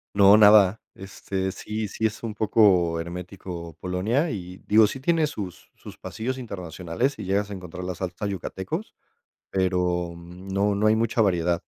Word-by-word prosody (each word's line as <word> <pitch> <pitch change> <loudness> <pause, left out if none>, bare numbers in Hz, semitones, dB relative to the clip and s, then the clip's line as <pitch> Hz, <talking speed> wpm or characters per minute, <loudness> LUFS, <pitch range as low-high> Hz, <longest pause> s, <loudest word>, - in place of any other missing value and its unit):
No, 100 +1 +7
nada. 105 -1 +6
Este, 95 0 -4
sí 105 +2 -4
sí 110 +2 0
es 110 +2 -9
un 110 -2 -3
poco 95 -6 +3
hermético 85 -1 -7
Polonia, 110 - 0
y, 90 -3 -6
digo, 110 0 +5
sí 135 - -6
tiene 160 +2 +2
sus 105 - -7
sus - - -12
pasillos 130 +4 -4
internacionales 90 - -3
y - - -5
llegas 100 +2 0
a - - -4
encontrar 90 -1 -8
la 90 0 -3
salsa 90 +3 -5
Yucatecos, 100 - -5 0.5
pero 90 -2 0
no 95 +4 -2
no 105 +2 +2
hay 110 - +5
mucha 115 0 +1
variedad, 85 -3 +1
95 Hz, 160 wpm, -25 LUFS, 90-110 Hz, 0.5 s, No